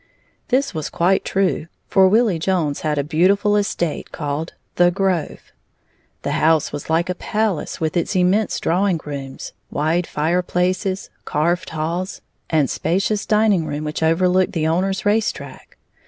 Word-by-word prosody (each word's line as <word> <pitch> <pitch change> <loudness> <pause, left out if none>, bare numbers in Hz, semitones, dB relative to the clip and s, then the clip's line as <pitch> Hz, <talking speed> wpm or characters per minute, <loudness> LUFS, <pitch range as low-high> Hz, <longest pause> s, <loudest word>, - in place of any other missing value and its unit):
This 270 +2 +1
was 155 -3 -3
quite 180 +3 +2
true, 190 -4 0 0.2
for 190 -1 +5
Willie 210 -3 +3
Jones 165 -5 0
had 150 -1 -1
a 140 - +1
beautiful 190 +7 +2
estate 200 -6 -1
called 150 +2 -4 0.2
"The 175 0 +6
Grove." 185 -3 -2 0.7
The - - -1
house 160 -1 +2
was 145 +1 -6
like 165 +2 +2
a 180 - -1
palace 210 -2 -2
with 160 -1 -1
its 175 +3 0
immense 185 +4 +2
drawing 180 0 +1
rooms, 140 -2 -7 0.2
wide 165 +4 0
fireplaces, 180 +4 -1
carved 175 +4 0
halls, 165 +4 -3 0.3
and 155 -4 +2
spacious 195 +8 -1
dining 210 -6 +3
room 145 +1 -3
which 150 +1 -4
overlooked 180 +3 +2
the 160 -2 0
owner's 190 +5 0
race 210 +1 +3
track. - - -12
175 Hz, 145 wpm, -20 LUFS, 160-195 Hz, 0.7 s, The